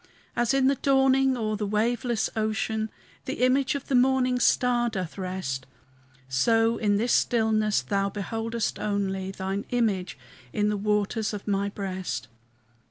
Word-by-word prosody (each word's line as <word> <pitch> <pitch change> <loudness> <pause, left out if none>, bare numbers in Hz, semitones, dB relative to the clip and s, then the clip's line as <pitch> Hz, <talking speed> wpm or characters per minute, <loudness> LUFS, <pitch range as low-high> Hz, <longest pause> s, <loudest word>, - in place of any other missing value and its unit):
As 240 +1 +2
in 270 -1 +3
the 275 - +5
dawning 270 -1 +3
o'er 215 -2 -1
the 210 0 -2
waveless 230 +2 0
ocean 220 0 -1 0.4
The 250 - 0
image 270 +2 +2
of 280 - -5
the - - -2
morning 255 0 +3
star 245 -1 +3
doth 185 -7 -4
rest, 180 -9 -4 0.6
So 225 - +2
in 205 -2 +1
this 235 +3 +1
stillness 215 -3 +2
Thou 200 -1 0
beholdest 225 +3 -3
only 195 -2 -1
Thine 195 +1 -3
image 210 - 0 0.4
in 210 0 +1
the 210 - 0
waters 210 +1 0
of 205 - -8
my 200 0 0
breast. 185 - -4
215 Hz, 145 wpm, -26 LUFS, 200-245 Hz, 0.6 s, the